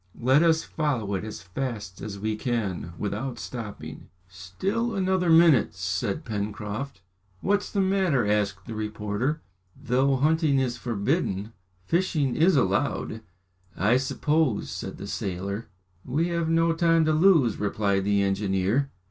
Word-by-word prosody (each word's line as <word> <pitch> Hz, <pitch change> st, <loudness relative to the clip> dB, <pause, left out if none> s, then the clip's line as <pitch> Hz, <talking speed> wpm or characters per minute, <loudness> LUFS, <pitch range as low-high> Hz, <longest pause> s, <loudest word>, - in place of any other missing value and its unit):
"Let 130 Hz, +5 st, +4 dB
us 165 Hz, -1 st, +3 dB
follow 130 Hz, -10 st, -2 dB
it 95 Hz, -, -2 dB
as 110 Hz, 0 st, -7 dB
fast 105 Hz, -1 st, -5 dB
as 105 Hz, -2 st, -6 dB
we 110 Hz, +2 st, -2 dB
can 105 Hz, -8 st, -2 dB
without 110 Hz, +7 st, -3 dB
stopping." 115 Hz, -5 st, -7 dB, 0.2 s
"Still 190 Hz, -, -3 dB
another 185 Hz, -2 st, +1 dB
minute!" 160 Hz, -, +5 dB
said 100 Hz, -, -2 dB
Pencroft. 105 Hz, +4 st, -4 dB, 0.4 s
"What's 205 Hz, +1 st, 0 dB
the 200 Hz, -, +1 dB
matter?" 190 Hz, -, +2 dB
asked 100 Hz, -2 st, 0 dB
the 115 Hz, -, -6 dB
reporter. 110 Hz, +6 st, -2 dB, 0.4 s
"Though 135 Hz, +3 st, +2 dB
hunting 155 Hz, +1 st, +2 dB
is 130 Hz, -2 st, 0 dB
forbidden, 110 Hz, -, -1 dB, 0.3 s
fishing 155 Hz, -, +1 dB
is 170 Hz, +3 st, +4 dB
allowed, 110 Hz, -1 st, 0 dB, 0.6 s
I 110 Hz, +6 st, +3 dB
suppose," 140 Hz, -1 st, 0 dB
said -, -, -6 dB
the -, -, -7 dB
sailor. 100 Hz, +3 st, -4 dB, 0.4 s
"We 155 Hz, +7 st, 0 dB
have 170 Hz, -1 st, -1 dB
no 165 Hz, 0 st, +3 dB
time 165 Hz, -1 st, +3 dB
to 155 Hz, -, +2 dB
lose," 155 Hz, -, +4 dB
replied 100 Hz, -1 st, 0 dB
the 100 Hz, 0 st, +2 dB
engineer. 100 Hz, +6 st, +1 dB
120 Hz, 135 wpm, -26 LUFS, 100-160 Hz, 0.6 s, minute